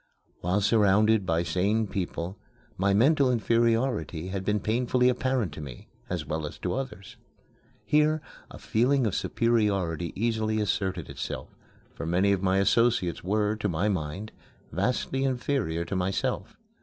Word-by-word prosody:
While 90 +4 0
surrounded 105 -1 +3
by 85 0 +1
sane 100 +6 +1
people 95 -2 -4 0.4
my 100 +2 +1
mental 135 +6 +4
inferiority 115 -6 +1
had 95 0 -3
been 105 +1 +1
painfully 125 +4 +2
apparent 125 -6 0
to 75 - -7
me, 70 -5 -10 0.2
as - - -3
well 80 -1 -3
as - - -9
to - - -2
others. 125 -8 -6 0.7
Here 150 +1 +3 0.3
a - - -10
feeling 125 +3 +2
of 105 - 0
superiority 100 -10 0
easily 110 0 0
asserted 95 -5 -1
itself, - - -5 0.4
for - - -6
many 95 +4 +3
of 95 -2 +1
my 95 0 +2
associates 100 -2 +2
were, 105 +3 +1
to 105 -1 -1
my 85 +5 0
mind, 95 +3 -3 0.4
vastly 125 - -1
inferior 125 - -1
to 95 - -4
myself. 100 +4 -2
105 Hz, 145 wpm, -27 LUFS, 90-120 Hz, 0.7 s, mental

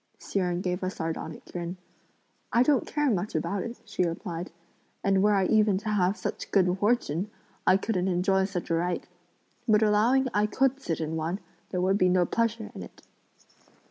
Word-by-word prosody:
Hsi 200 - -3
Jen 180 -1 0
gave 180 0 -2
a 185 - -1
sardonic 160 -3 -5
grin. 175 +1 -4 0.7
"I 240 - +5
don't 280 -1 +2
care 295 -3 +1
much 195 0 -2
about 200 -1 -1
it," 235 +4 -5
she - - -1
replied; 170 0 -3 0.5
"and 195 -1 +3
were 210 +1 +4
I 195 -1 +3
even 210 -2 +3
to 210 +2 -4
have 195 -1 +2
such - - -4
good 185 -2 +3
fortune, 205 -4 +1 0.4
I 185 - +7
couldn't 190 -2 -1
enjoy 190 +1 +2
such 185 -3 -4
a - - +3
right. 175 +2 0 0.6
But 215 -1 +5
allowing 230 +6 +3
I 210 +1 +3
could 270 +4 +1
sit 165 - -2
in 160 +1 -2
one, 165 +5 -2 0.3
there 180 - -1
would 190 +2 +2
be 185 - +4
no 180 -1 +3
pleasure 230 +1 -1
in - - -8
it!" - - -12
190 Hz, 185 wpm, -28 LUFS, 180-215 Hz, 0.7 s, I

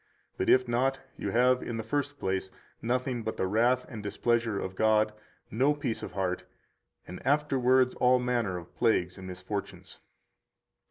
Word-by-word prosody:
But - - -1
if 130 -1 +5
not, 130 +3 +1 0.2
you - - -4
have, 125 +2 +3
in 115 - -4
the 110 - -3
first 145 +5 -2
place, 95 -3 -2 0.3
nothing 125 +1 -1
but 110 0 -4
the - - 0
wrath 120 +6 +2
and 110 -4 -7
displeasure 110 +1 0
of 95 - -4
God, 110 +1 +3 0.4
no 135 +6 +2
peace 135 -6 -3
of - - -7
heart, 95 -2 -1 0.6
and 90 - -9
afterwards 130 -3 +3
all 125 +1 +4
manner 120 -7 0
of 85 -1 -10
plagues 90 -5 +1
and 95 - -8
misfortunes. 95 +3 -6
120 Hz, 160 wpm, -29 LUFS, 100-130 Hz, 0.6 s, if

